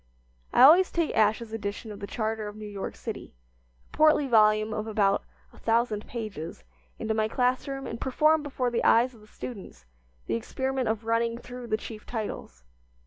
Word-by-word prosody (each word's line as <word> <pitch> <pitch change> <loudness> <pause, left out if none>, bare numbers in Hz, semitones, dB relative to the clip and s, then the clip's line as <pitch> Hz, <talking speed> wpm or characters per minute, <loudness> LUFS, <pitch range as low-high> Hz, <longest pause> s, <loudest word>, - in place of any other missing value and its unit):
I - - +6
always 345 +7 +8
take 335 -2 -1
Ash's 220 +1 +2
edition 210 0 -4
of 205 - -9
the 200 - -6
charter 220 -1 -2
of 210 - -8
New 215 0 -8
York 205 -2 -5
City - - -7 0.5
a - - -16
portly 310 -1 +5
volume 215 -3 +4
of 215 0 -3
about 205 -2 +2 0.3
a - - -16
thousand 225 -2 0
pages 205 - -6 0.3
into 220 - -2
my 220 0 +1
class 250 +3 0
room 270 0 -4
and 230 - -6
perform 305 +4 +3
before 265 -4 -2
the 235 - 0
eyes 245 +3 +4
of 225 - -17
the 210 - -17
students 195 - -9 0.4
the - - -2
experiment 260 - -2
of 220 0 -1
running 230 +1 +1
through 245 0 -9
the 215 - +1
chief 215 -1 -9
titles. 210 - -5
225 Hz, 185 wpm, -27 LUFS, 215-250 Hz, 0.5 s, always